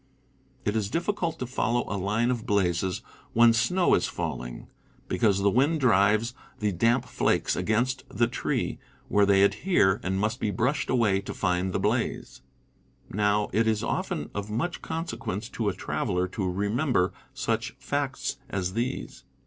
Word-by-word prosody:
It 105 - 0
is 105 -3 0
diflScult 170 - -1
to 125 - -3
follow 120 -1 0
a - - -3
line 105 +5 +1
of 120 -2 -3
blazes 95 -2 +1 0.3
when 115 0 +6
snow 175 +11 +2
is - - +3
falling, - - -5 0.4
because 100 -4 +2
the 100 - +4
wind 145 +7 +3
drives 110 -1 +3 0.2
the 105 -1 0
damp 115 +7 +2
flakes - - +1
against 125 +4 0
the 120 +3 +2
tree, 120 - -2 0.3
where 100 -1 +4
they 100 -1 +5
adhere, 100 - +3
and 95 +1 -1
must 110 +4 0
be 105 - 0
brushed 125 +9 0
away 110 -6 +2
to 100 - -7
find 90 0 0
the - - -1
blaze. - - -1 0.7
Now, 105 +1 +1
it 110 +3 +3
is 110 -1 +1
often - - -2
of 100 +1 -4
much 130 +11 -2
consequence 115 - -4
to 110 -3 -1
a - - -2
traveler 90 -1 -1
to 95 -2 -2
remember 100 +2 +1 0.2
such - - -1
facts - - -2
as 95 -2 -2
these. 115 - -3
110 Hz, 155 wpm, -27 LUFS, 100-120 Hz, 0.7 s, when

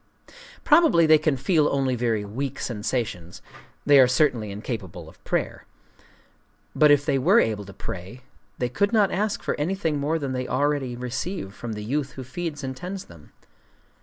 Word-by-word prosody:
Probably 300 - +5
they 155 -1 +6
can 150 -3 +1
feel 150 +3 +2
only 135 -2 0
very 115 -3 -1
weak 130 +6 -4
sensations: 105 -6 -3 0.5
they 145 -1 +7
are 130 - +7
certainly 125 -5 +1
incapable 100 -5 -6
of - - -17
prayer. - - -3 1.1
But 150 - +5
if 145 -1 +4
they 140 -3 +1
were 190 - +5
able 105 -2 0
to 100 - -10
pray, 95 +8 -8 0.4
they 125 - -1
could 200 +12 0
not 205 -4 +4
ask 205 +2 -1
for - - -1
anything 160 -2 -1
more 150 +3 0
than 140 -4 -3
they 125 0 -3
already 140 -2 0
receive 125 - -4
from 115 +1 -6
the 105 0 -6
youth 135 +4 -2
who 130 - -7
feeds 150 +3 -5
and 130 0 -4
tends 185 +6 -6
them. 85 -3 -16
130 Hz, 170 wpm, -24 LUFS, 115-155 Hz, 1.1 s, they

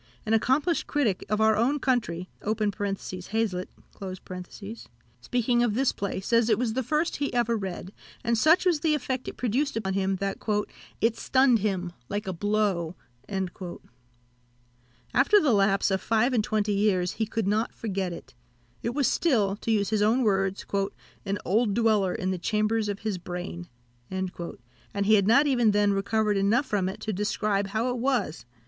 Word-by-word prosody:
An 220 - 0
accomplished 275 +9 +2
critic 245 -11 0
of 210 +1 +1
our 220 0 +4
own 250 +7 +2
country 225 -11 -1 0.2
(Hazlitt), 205 -1 -2 1.5
speaking 240 - +1
of 235 -3 +1
this 265 +2 +2
play, 200 -1 -3
says 230 +3 +2
it 215 - +4
was 235 -1 -1
the 260 - 0
first 300 +7 0
he 285 0 -1
ever 235 -1 +2
read, 190 -2 -5 0.3
and 235 0 +2
such 320 +11 +4
was 345 -4 +3
the 305 0 +2
effect 260 -2 -3
it - - -6
produced 250 +3 0
on 190 - 0
him, 195 0 +1
that 195 +1 -3 0.6
"it 230 0 +3
stunned 260 -3 +3
him, 185 -4 -2 0.2
like 205 +1 -2
a 190 - -3
blow." 195 -3 0 0.3
After 185 -2 -4 1.6
the 290 - +3
lapse 195 -1 +3
of 190 - +1
five 230 +3 +2
and 225 -4 +2
twenty 210 -1 0
years, 195 -3 +2
he 220 - -2
could 220 -2 -2
not 215 +3 +1
forget 195 -4 -3
it; 150 -5 -10 0.5
it 235 +2 -3
was 285 -3 +2
still, 215 - +2
to 230 - -6
use 210 -2 +1
his 215 -1 +2
own 225 +5 +3
words, 195 -2 +1 0.6
"an 200 +1 0
old 210 +2 +2
dweller 215 -5 +2
in 185 0 -1
the 185 - -3
chambers 215 +3 0
of 200 -1 -4
his 215 -4 -2
brain," 175 0 -6 0.4
and 190 -1 -3 0.7
he 215 +2 +4
had 200 -2 +4
not 275 +7 +6
even 245 -6 +3
then 205 -1 +3
recovered 210 +1 +1
enough 215 +8 +2
from 200 -6 0
it 190 - -7
to 215 - -2
describe 205 0 0
how 220 +5 -1
it 245 - -3
was. 240 - -1
215 Hz, 170 wpm, -27 LUFS, 195-235 Hz, 1.6 s, not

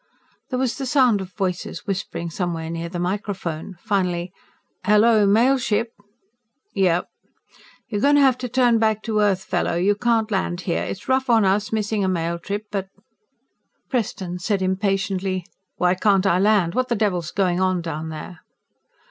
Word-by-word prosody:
There 255 - -2
was 255 0 -1
the 270 - -3
sound 250 -6 +3
of 190 -1 -8
voices 180 -3 -3
whispering 170 -4 -4
somewhere 165 -2 -3
near 170 0 -4
the 175 - -5
microphone. 185 -2 -3
Finally: 180 -4 -1 0.5
"Hello, 210 0 +4
Mail 240 +7 +4
Ship?" 230 -1 0 0.8
"Yeah?" 180 -3 +2 0.9
"You're 210 -4 -3
going 285 +3 +4
to 290 - +5
have 265 -2 +4
to 250 - -4
turn 245 -2 +3
back 220 -1 +1
to 220 -2 0
Earth, 195 -2 +2
fellow. - - -1
You 185 +4 +3
can't 225 0 +1
land 185 -2 -1
here. 175 -2 -1
It's 195 - -6
rough 260 0 +1
on 225 -3 +5
us, 200 +2 +1
missing 215 -1 0
a - - +1
mail 170 -2 -1
trip, 205 +5 -4
but 195 -2 -2 0.5
" - - -49
Preston 190 -7 -2
said 195 +1 -1
impatiently, 190 -1 -1 0.3
"Why 180 0 +2
can't 195 0 +2
I 180 -2 +3
land? 200 -4 +3
What 255 0 0
the 240 - 0
devil's 185 -7 0
going 185 -3 0
on 185 -2 +1
down 160 -1 -4
there?" 160 +2 -8
195 Hz, 170 wpm, -22 LUFS, 180-220 Hz, 0.9 s, to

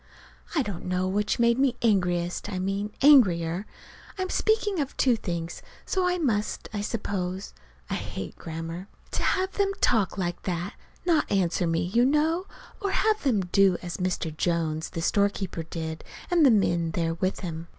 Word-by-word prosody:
I 290 - +3
don't 200 -7 -6
know 185 0 0
which 205 +3 0
made 235 +1 +3
me 265 -3 +3
angriest 180 -3 +1
I 185 - -3
mean 195 +3 -2
angrier. 185 - +5 0.5
(I'm 370 -1 -2
speaking 425 -4 +1
of 280 -2 -3
two 255 -3 +4
things, 170 -5 -4 0.2
so 370 -1 +1
I 360 0 +1
must, 225 -11 -1
I 205 - -2
suppose. 195 -3 -3 0.3
I - - -4
hate 95 - -5
grammar!) 165 +3 -6 0.2
To - - -2
have 380 0 +1
them 395 -1 +1
talk 215 -6 +2
like 175 -2 -2
that 180 +1 -3 0.3
not 335 -3 +2
answer 180 -2 +1
me, 165 0 +1
you 205 +8 +2
know 315 +7 +2 0.3
or 400 - 0
have 430 +2 +2
them 240 -8 +2
do 185 0 +3
as 175 -1 -4
Mr. 180 -4 -2
Jones, 160 -1 -1
the 165 -2 -4
storekeeper, 200 -3 0
did, 160 0 -5 0.3
and 345 -2 +5
the 275 - +8
men 175 -7 +2
there 165 -1 0
with 185 +3 -2
him. 165 -2 -5
195 Hz, 170 wpm, -27 LUFS, 175-255 Hz, 0.5 s, the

